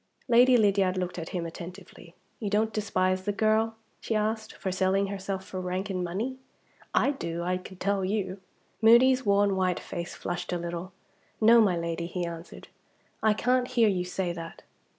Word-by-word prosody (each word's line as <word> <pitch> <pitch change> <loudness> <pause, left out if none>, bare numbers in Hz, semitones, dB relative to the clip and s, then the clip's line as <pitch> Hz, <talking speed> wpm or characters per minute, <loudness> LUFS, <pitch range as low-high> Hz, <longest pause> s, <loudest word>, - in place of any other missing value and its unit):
Lady 245 +1 +6
Lydiard 195 -4 +2
looked 180 -1 -3
at 165 - -6
him 175 -2 -3
attentively. 175 0 -10 0.2
"You 210 - -2
don't 215 +2 +1
despise 185 -3 0
the 205 +2 -1
girl," 220 +2 +1 0.2
she 225 - -2
asked, 215 +1 -1
"for 190 - -4
selling 190 +1 +2
herself 190 -1 -4
for 185 - -5
rank 185 +2 -3
and 185 -1 -2
money? 215 +10 -3 0.5
I - - +3
do 170 -11 -4
I 180 +1 0
can 185 +1 -11
tell 200 +1 0
you!" 190 -1 -2 0.4
Moody's 250 +2 +6
worn 200 0 +3
white 185 -1 +1
face 170 0 -6
flushed 175 0 -4
a 175 - 0
little. 170 +2 -5 0.5
"No, 230 +1 +7
my 190 -5 +3
Lady," 170 0 -3
he 180 0 -3
answered, 170 0 -8 0.5
"I 215 -1 +3
can't 250 +2 +1
hear 235 -4 +3
you 185 -3 0
say 180 0 -2
that! 165 -1 -9
190 Hz, 175 wpm, -28 LUFS, 180-215 Hz, 0.5 s, No